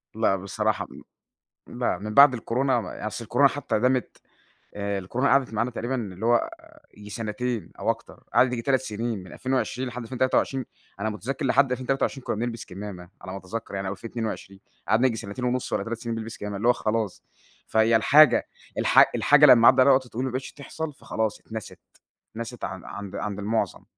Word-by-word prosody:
لأ 110 -3 +2
بصراحة 95 0 -2 0.8
لأ 120 0 -1
من 105 +1 -6
بعد 140 +2 +8
الكورونا 125 +1 0
ما 90 - -7
ي - - -5
أصل - - -5
الكورونا - - +4
حتى - - -2
دامِت، 125 +1 0 0.6
آآ، 100 -1 -2
الكورونا 120 +9 0
قعدت 135 -4 +3
معانا 115 +3 0
تقريبًا 120 +2 -3
اللي 105 -3 -5
هو 120 - +3 0.5
ييجي 105 0 -11
سنتين 115 +2 -3
أو - - -1
أكتر، - - -4
قعدت 130 - +5
ييجي 120 - -2
3 130 +1 +2
سنين، 110 -3 -3
من 90 - -12
2020 130 0 -2
لحد 120 0 -6
2023، 130 +1 0 0.3
أنا 110 +2 -1
مُتذكر 130 +7 -4
لحد 135 +1 +3
2023 130 +1 -1
كنّا - - -2
بنلبس 115 +1 -4
كمامة 95 -2 -8
على 95 0 -8
ما 95 - -5
أتذكر 100 +3 -6
يعني 95 0 -3
أو 95 - -2
2022، 110 -3 -6 0.3
قعدنا 115 +4 +3
ييجي 115 -2 -2
سنتين 110 +4 -5
ونص 125 0 -1
والّا - - 0
3 115 0 -4
سنين 115 -1 -3
بنلبس 115 +1 -6
كمامة 105 -1 -5
اللي 115 - 0
هو 125 - +6
خلاص. 110 -3 -2 0.4
فهي 110 +1 +3
الحاجة 145 +5 +6 0.3
الح - - +6
الحاجة 145 0 +6
لمّا 120 -4 +8
عدى 130 0 +7
عليها 135 +1 +7
وقت 130 -1 +1
طويل 125 +3 -3
وما 130 - -2
بقتش 130 +1 -4
تحصل، 150 +1 -6
فخلاص 110 -5 -3
اتنست، 110 -2 -8 0.5
اتنست 115 +1 -6
عن 95 -2 -7
عند 100 -2 -7
عند 105 -1 -4
المعظم. 110 +3 -1
115 Hz, 190 wpm, -25 LUFS, 105-130 Hz, 0.8 s, بعد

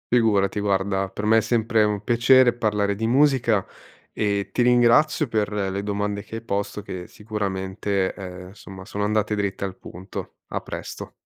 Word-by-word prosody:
Figurati 105 -4 +2
guarda, 95 -1 0
per 105 +2 -5
me 110 +1 +5
è - - +4
sempre 115 0 +2
un 105 -1 -1
piacere 120 +2 +5
parlare 105 -3 0
di 110 +2 -2
musica 125 -5 +3 0.5
e 100 -2 -1
ti 125 - 0
ringrazio 125 +6 +4
per 110 -3 -1
le 100 -1 -2
domande 100 0 -2
che 110 - -9
hai 115 - -5
posto 100 -1 -3
che 90 -3 -7
sicuramente, 100 -2 -2
ehm, 90 -2 -8
insomma, 95 -1 -11
sono 105 - -4
andate 105 0 +1
dritte 100 -1 -2
al 95 -1 -6
punto. 90 +2 -8
A - - -3
presto. - - -7
105 Hz, 165 wpm, -23 LUFS, 100-115 Hz, 0.5 s, me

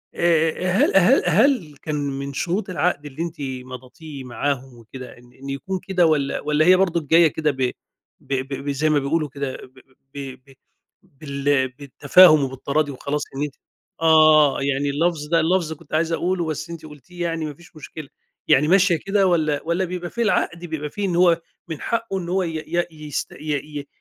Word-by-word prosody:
آآ 165 +1 +1
هل 185 - +3
هل 215 +9 +5
هل 215 - +2
كان 155 -2 -3
من 140 -1 -4
شروط 180 +9 -2
العقد 175 -4 -1
اللي 145 +2 -7
أنتِ 170 -1 -5
مضتيه 130 +2 -8
معاهم 130 +1 -3
وكده 125 +3 -11
إن 120 0 -19
إن 135 +1 -10
يكون 185 +8 -4
كده 180 -2 +1
والّا 150 -4 +1
والّا 150 +1 +1
هي 185 +1 +7
برضه 170 -5 0
جاية 165 +2 +6
كده 155 0 -1
ب 135 - -12 0.6
ب - - -6 0.3
ب 145 - -4
زي 145 +3 0
ما 150 -1 +3
بيقولوا 150 +2 -1
كده 140 -1 -5
ب 130 0 -19 0.3
ب 135 -2 -7
ب 135 - -18 0.7
بال 140 -2 0
بالتفاهم 145 +4 +5
وبالتراضي 140 +3 -1
وخلاص؟ 140 +2 -3
إن 140 - -2
أنتِ 145 -1 -5 0.5
آه، 155 -3 +5
يعني 140 +1 0
اللفظ 150 +1 -1
ده 165 +2 +2
اللفظ 165 0 +1
كنت 155 -1 -17
عايز 160 +1 +1
أقوله 175 +1 -1
بس 155 +1 -4
أنت 165 -2 -8
قلتيه 155 +4 -9
يعني 165 -2 -2
ما 150 - -5
فيش 170 +3 -19
مشكلة، 155 -1 -9 0.4
يعني 150 +3 +4
ماشية 185 +1 +4
كده 195 -1 +2
والّا 155 -5 +1
والّا 170 +3 0
بيبقى 175 -1 -5
في 235 - -4
العقد 210 -6 0
بيبقى 155 -3 -4
فيه 205 +6 -4
إن 180 -3 -1
هو 170 -1 +4 0.3
من 160 -4 -6
حقه 230 -4 -2
إن 170 -1 -6
هو 190 +1 +1
ي 165 -2 -4
ي 175 +2 0 0.2
يست 145 - -4
ي 150 0 -4
ي 140 - -9
155 Hz, 185 wpm, -22 LUFS, 140-170 Hz, 0.7 s, هي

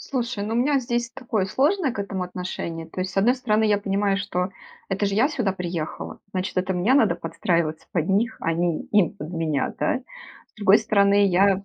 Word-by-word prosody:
Слушай, 240 -5 -3
ну, 220 +2 -2
у - - +1
меня 275 +4 +3
здесь 240 -1 -2
такое 230 -5 -2
сложное 290 - +1
к - - -9
этому 200 -2 -3
отношение. 180 -2 -5
То 185 - -6
есть, 185 0 -3
с - - -14
одной 220 +6 +4
стороны, 220 -4 +1
я 210 -1 +3
понимаю, 200 0 0
что 190 -2 -2 0.4
это 195 +1 0
же 195 - -1
я 235 +7 +4
сюда 240 -10 -1
приехала, 175 -4 -5
значит, 185 +1 -3
это 185 +1 +1
мне 185 +8 +2
надо 230 -7 +4
подстраиваться 165 -1 -1
под 165 -2 0
них, 220 +6 +1
а 165 - 0
не 170 -1 0
им 205 -6 +3
под 150 +3 -7
меня, 160 -4 -1
да. 260 - 0 0.5
С - - -42
другой 205 -2 +5
стороны, 200 0 +4
я 195 +1 +3
200 Hz, 205 wpm, -24 LUFS, 180-225 Hz, 0.5 s, другой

